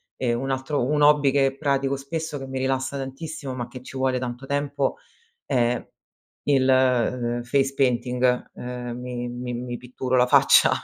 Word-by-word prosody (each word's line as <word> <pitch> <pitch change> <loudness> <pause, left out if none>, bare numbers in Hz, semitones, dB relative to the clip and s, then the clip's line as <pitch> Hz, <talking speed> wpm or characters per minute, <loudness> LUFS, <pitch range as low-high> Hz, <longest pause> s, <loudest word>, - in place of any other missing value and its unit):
ehm, 120 -2 0
un 135 +1 -3
altro 135 +1 -1
un 150 +2 +1
hobby 145 -2 +5
che 135 -1 +2
pratico 140 -2 +1
spesso 155 +2 -4
che 135 - -7
mi 130 0 -4
rilassa 130 +1 -1
tantissimo, 135 +1 -6
ma 120 -2 -4
che 125 -1 -10
ci 130 - -8
vuole 130 -1 +1
tanto 125 +1 -5
tempo 140 0 -1 0.5
è 120 -3 +1 0.6
il, 135 -2 +3
ehm, 125 -2 +2
face 135 +2 +1
painting. 125 -1 +1
Ehm, 125 -1 -5
mi 125 -1 -4
mi 125 0 -5
mi 120 0 -4
pitturo 125 +1 -2
la 125 0 +5
faccia - - +6
130 Hz, 165 wpm, -24 LUFS, 125-135 Hz, 0.6 s, faccia